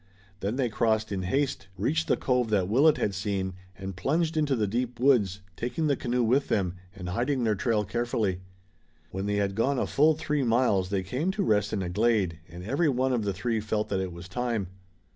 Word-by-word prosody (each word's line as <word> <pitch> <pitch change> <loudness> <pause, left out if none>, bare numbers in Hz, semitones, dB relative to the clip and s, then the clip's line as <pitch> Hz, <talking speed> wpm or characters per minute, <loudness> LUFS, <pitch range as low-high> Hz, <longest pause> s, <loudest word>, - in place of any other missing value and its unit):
Then 100 +4 -2
they 130 -2 +1
crossed 110 -1 0
in 95 -2 -1
haste, 135 +9 -1
reached 155 - 0
the - - +2
cove 125 -3 +1
that 100 -4 +2
Willet 140 +9 +4
had 100 - 0
seen, 95 -1 -2 0.2
and 95 -1 -6
plunged 160 - 0
into 150 -3 +2
the 110 -3 +1
deep 120 +4 -2
woods, 105 -8 +3
taking 125 - -2
the 145 -2 +3
canoe 125 -1 0
with 130 +5 +2
them, 90 -4 0 0.2
and 90 -2 -6
hiding 125 +7 0
their 110 -2 +2
trail 105 +1 0
carefully. 110 -3 -1 0.7
When 95 +2 -3
they 105 - 0
had 100 -1 0
gone 130 +7 +1
a - - +1
full 155 +2 +3
three 150 -1 -1
miles 115 -6 +2
they 95 -1 -1
came 130 - -2
to 200 - -1
rest 105 - +2
in 100 - -1
a 90 - -3
glade, 100 -5 +1
and 85 +2 -9
every 140 - +1
one 130 0 +1
of 115 -4 0
the 100 - +1
three 110 +4 -1
felt 105 0 -2
that 95 - 0
it 95 -1 -3
was 85 +1 -9
time. 115 -2 -2
110 Hz, 215 wpm, -28 LUFS, 95-130 Hz, 0.7 s, Willet